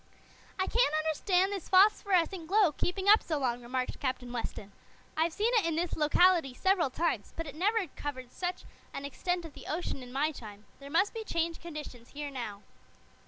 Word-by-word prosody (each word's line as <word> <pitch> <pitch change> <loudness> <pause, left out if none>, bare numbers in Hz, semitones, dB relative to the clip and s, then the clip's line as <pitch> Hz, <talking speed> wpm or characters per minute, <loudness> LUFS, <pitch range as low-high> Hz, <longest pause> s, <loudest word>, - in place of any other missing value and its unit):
"I 375 - +1
can't 460 -8 +2
understand 360 +5 +2
this 390 -4 -6
phosphorescent 375 -3 +4
glow 395 -2 +4
keeping 375 +6 -2
up 425 +2 +8
so 315 - -2
long," 245 -3 -1
remarked 255 +1 -3
Captain 255 -2 -3
Weston. 215 -4 -5 0.4
"I've 325 +2 +2
seen 435 +8 0
it 425 - +2
in 330 - 0
this 340 +1 -1
locality 315 -2 +4
several 375 -4 +2
times, 285 -7 -1
but 330 - -3
it 290 - -7
never 400 +6 +1
covered 255 -4 -6
such 360 0 -4 0.3
an 275 - -4
extent 350 +5 -2
of 320 - -10
the - - -11
ocean 310 -3 -3
in 250 -1 -10
my 290 +4 +1
time. 215 -6 -11
There 280 0 -10
must 360 +7 +2
be 450 -1 -4
changed 335 -4 -2
conditions 300 -8 -9
here 290 0 -5
now." 215 -6 -6
320 Hz, 185 wpm, -31 LUFS, 265-370 Hz, 0.4 s, up